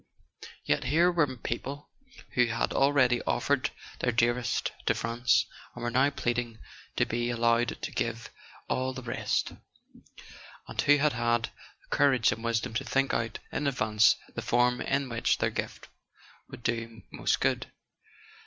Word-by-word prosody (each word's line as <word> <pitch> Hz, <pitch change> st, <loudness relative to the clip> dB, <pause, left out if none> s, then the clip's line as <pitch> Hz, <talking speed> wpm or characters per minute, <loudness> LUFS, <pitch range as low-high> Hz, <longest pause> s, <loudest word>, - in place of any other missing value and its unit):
Yet -, -, +1 dB
here 165 Hz, +7 st, +4 dB
were 150 Hz, -7 st, +1 dB
people 135 Hz, +5 st, -5 dB, 0.4 s
who 125 Hz, -1 st, +3 dB
had 115 Hz, 0 st, -1 dB
already 135 Hz, -3 st, +3 dB
offered 135 Hz, +2 st, +1 dB, 0.3 s
their 125 Hz, -, +1 dB
dearest 120 Hz, +1 st, +1 dB, 0.2 s
to -, -, +3 dB
France, 120 Hz, +1 st, +2 dB, 0.3 s
and -, -, -7 dB
were 120 Hz, -, -1 dB
now 130 Hz, +3 st, +4 dB
pleading 120 Hz, -4 st, -2 dB, 0.4 s
to -, -, +2 dB
be 120 Hz, +1 st, -1 dB
al¬ 120 Hz, -1 st, -2 dB
lowed 115 Hz, +1 st, +2 dB
to -, -, -5 dB
give 115 Hz, 0 st, -3 dB, 0.4 s
all 130 Hz, 0 st, -1 dB
the 130 Hz, -, -7 dB
rest; 120 Hz, -, -1 dB, 1.2 s
and -, -, -2 dB
who 145 Hz, 0 st, +5 dB
had 150 Hz, +1 st, +2 dB
had 115 Hz, -1 st, 0 dB, 0.3 s
the -, -, -4 dB
cour¬ 145 Hz, -2 st, +5 dB
age 115 Hz, -3 st, +3 dB
and 110 Hz, +2 st, -5 dB
wisdom 115 Hz, -1 st, -1 dB
to 120 Hz, +4 st, -1 dB
think 135 Hz, +2 st, 0 dB
out 115 Hz, -1 st, -1 dB
in 145 Hz, -, -1 dB
advance 110 Hz, -5 st, +4 dB, 0.2 s
the -, -, -4 dB
form 125 Hz, +1 st, +2 dB
in 140 Hz, 0 st, 0 dB
which 115 Hz, -2 st, +1 dB
their -, -, 0 dB
gift -, -, -5 dB, 0.6 s
would 120 Hz, -, -11 dB
do 115 Hz, -1 st, -3 dB
most -, -, 0 dB
good. -, -, 0 dB
120 Hz, 160 wpm, -29 LUFS, 115-135 Hz, 1.2 s, who